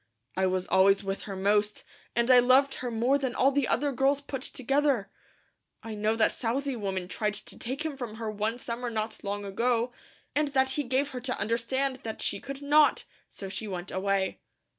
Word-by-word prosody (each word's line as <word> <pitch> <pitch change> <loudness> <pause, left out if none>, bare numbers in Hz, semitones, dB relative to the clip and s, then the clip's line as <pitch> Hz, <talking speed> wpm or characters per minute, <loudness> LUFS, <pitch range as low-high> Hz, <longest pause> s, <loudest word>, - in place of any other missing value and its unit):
I 190 0 +2
was 185 0 0
always 195 +1 +4
with 195 0 -3
her 195 - -4
most, 205 +2 +1 0.3
and 235 +2 +3
I 250 - +9
loved 260 +3 +5
her 250 - -2
more 240 +5 +2
than 260 -3 -2
all 270 +2 +4
the 280 -3 +1
other 285 +2 +1
girls 270 +2 +2
put 280 -2 -6
together. 270 -5 0 0.7
I 225 - -6
know 215 +1 0
that 225 - +3
Southey 265 +3 -1
woman 190 -4 -3
tried 210 +2 -1
to - - -6
take 270 +6 -3
him 310 -3 -2
from 245 -5 -6
her 220 -1 -4
one 215 +3 -2
summer 240 0 -4
not 220 -1 -4
long 205 0 -3
ago, 235 +4 0 0.4
and 300 +1 +2
that 265 0 +3
he 295 - 0
gave 260 +3 +1
her 255 -3 -6
to 255 +1 -2
understand 250 +5 0
that 225 -3 -6
she - - -1
could 275 +1 -7
not, 295 +1 +4 0.3
so 195 - -7
she 205 +3 -5
went 180 -2 -5
away. 195 0 0
235 Hz, 200 wpm, -28 LUFS, 205-270 Hz, 0.7 s, I